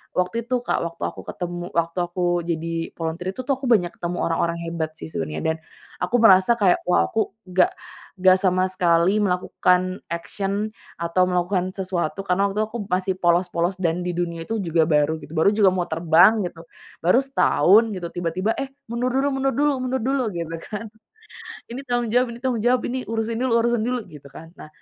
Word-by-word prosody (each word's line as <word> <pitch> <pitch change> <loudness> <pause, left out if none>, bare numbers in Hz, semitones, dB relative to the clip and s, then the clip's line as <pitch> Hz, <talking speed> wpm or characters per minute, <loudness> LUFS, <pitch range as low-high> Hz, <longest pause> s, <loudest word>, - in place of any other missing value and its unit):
waktu 220 +6 -1
itu 250 0 0
Kak, - - 0
waktu 170 0 -7
aku - - -10
ketemu 175 0 -5
waktu 170 +1 0
aku 175 0 0
jadi 165 0 -3
volunteer 170 +3 -3
itu 255 - -4
tuh, 275 - +1
aku 265 - -7
banyak 185 -8 +3
ketemu 175 +1 -4
orang-orang 170 0 0
hebat 165 -2 -3
sih 160 - -9
sebenernya, 75 - -4
dan 160 0 0 0.4
aku 180 +7 -1
merasa 190 +1 +6
kayak, 190 -5 +3
wah 180 - +4
aku 190 - -1 0.2
nggak 180 0 +3 0.5
nggak 185 0 +6
sama 185 -1 +2
sekali 175 +1 +2
melakukan 180 0 +1
action 200 +5 -3 0.3
atau 170 +2 +1
melakukan 180 +1 0
sesuatu. 185 -3 -3
Karena 195 +1 +1
waktu 210 - -3
itu 215 - +1
aku 235 +1 -5
masih 185 0 0
polos 175 0 +2
polos 175 +3 -1
dan 175 0 0
di 180 - -1
dunia 170 -1 -3
itu 225 -1 -2
juga 165 -3 +2
baru 150 0 +2
gitu. 145 - -12
Baru 160 +4 +4
juga 200 -4 +5
mau 180 -1 -1
terbang 175 +6 +4
gitu, 165 -1 -7 0.4
baru 180 +9 +4
setahun 225 - +4
gitu, 175 -2 -4
tiba-tiba 180 +5 -1
eh 275 - -3 0.2
mundur 240 +2 -1
dulu 270 +2 +2
mundur 270 0 +1
dulu 290 +1 +2
mundur 255 -1 -1
dulu 265 +1 +1
gitu 165 -1 -4
kan. 210 +5 -6 0.9
Ini 260 +3 -5
tanggung 240 -2 0
jawab 250 +2 +3
ini - - -11
tanggung 255 -3 0
jawab, 245 +2 +2
ini 255 -1 -3
urusin 225 0 -2
dulu 255 -1 +1
urusin 235 -2 +1
dulu 250 -1 -1
gitu 150 -2 -13
kan. 165 0 -11
Nah, - - -9
185 Hz, 195 wpm, -23 LUFS, 170-225 Hz, 0.9 s, merasa